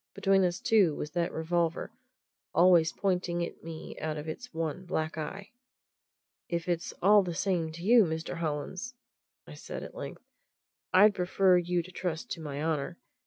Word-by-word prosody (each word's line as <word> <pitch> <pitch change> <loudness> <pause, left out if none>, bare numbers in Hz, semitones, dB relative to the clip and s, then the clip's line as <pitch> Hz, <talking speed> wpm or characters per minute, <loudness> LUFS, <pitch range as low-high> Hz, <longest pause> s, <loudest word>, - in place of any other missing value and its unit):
Between 195 -1 +3
us, 175 -1 0
too, 195 -9 +3
was 150 - -5
that 170 0 -1
revolver 170 +4 -1 0.6
always 170 -2 +6
pointing 180 -3 -1
at - - -11
me 165 -1 -8
out 155 -1 -3
of 150 +1 -6
its 245 +11 -6
one 165 +2 -3
black 160 -3 -2
eye. 175 +6 -6 1.0
"If 170 -1 -2
it's 170 -1 -1
all 205 +2 +7
the 175 -3 -4
same 170 -4 0
to 170 +1 -9
you, 225 +1 +6
Mr. 160 +1 -4
Hollins," 170 - -4 0.6
said - - -7
I - - -5
at - - -10
length, - - -8 0.7
"I'd 205 +3 +7
prefer 185 0 +3
you 175 0 0
to 185 - -12
trust 175 -3 -4
to 165 - -4
my 145 -1 -4
honour. 160 +1 -1
175 Hz, 165 wpm, -30 LUFS, 160-185 Hz, 1.0 s, all